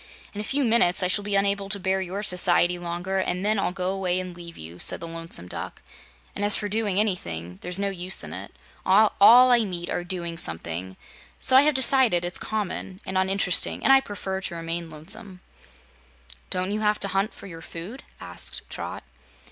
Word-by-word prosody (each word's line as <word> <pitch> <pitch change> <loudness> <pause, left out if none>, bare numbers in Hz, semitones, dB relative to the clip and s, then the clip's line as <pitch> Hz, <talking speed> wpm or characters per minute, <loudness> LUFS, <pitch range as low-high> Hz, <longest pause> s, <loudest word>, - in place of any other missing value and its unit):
In 205 - -5
a - - -5
few 280 +6 0
minutes 220 -7 +3
I - - +3
shall 205 +3 +3
be 205 0 -1
unable 200 0 +1
to 200 0 0
bear 190 0 0
your 190 +3 -4
society 180 -2 +3
longer, 175 +2 -3
and 185 0 -2
then 215 0 +2
I'll 195 - 0
go 185 0 -2
away 185 -2 -1
and 185 -1 -6
leave 170 -1 -10
you," 85 +3 -10
said - - +3
the 170 - -5
Lonesome 165 - -5
Duck. - - -6 0.5
"And, 205 - -3
as 205 0 +4
for 210 - -1
doing 205 -2 0
anything, 90 - -3
there's 180 +1 -2
no 200 0 -1
use 185 0 -1
in - - -8
it. - - -7 0.3
All 205 +3 +4 0.4
I 240 - +6
meet 175 -4 -5
are 175 - -2
doing 170 -2 -3
something, 85 +3 -4 0.4
so 260 - +3
I 265 - +9
have 300 0 +3
decided 255 -9 +3
it's 175 - -4
common 195 -3 -4
and 190 - -5
uninteresting 190 -1 +2
and 270 - +6
I 270 - +6
prefer 190 -5 -5
to 190 - -5
remain 165 0 -4
lonesome." 180 +5 -5 1.1
"Don't 185 +1 -1
you 210 - -1
have 210 -1 +1
to 200 - +2
hunt 195 +3 0
for - - -13
your 165 -4 -10
food?" 180 +12 -8 0.2
asked - - -5
Trot. - - -6
190 Hz, 200 wpm, -25 LUFS, 175-205 Hz, 1.1 s, I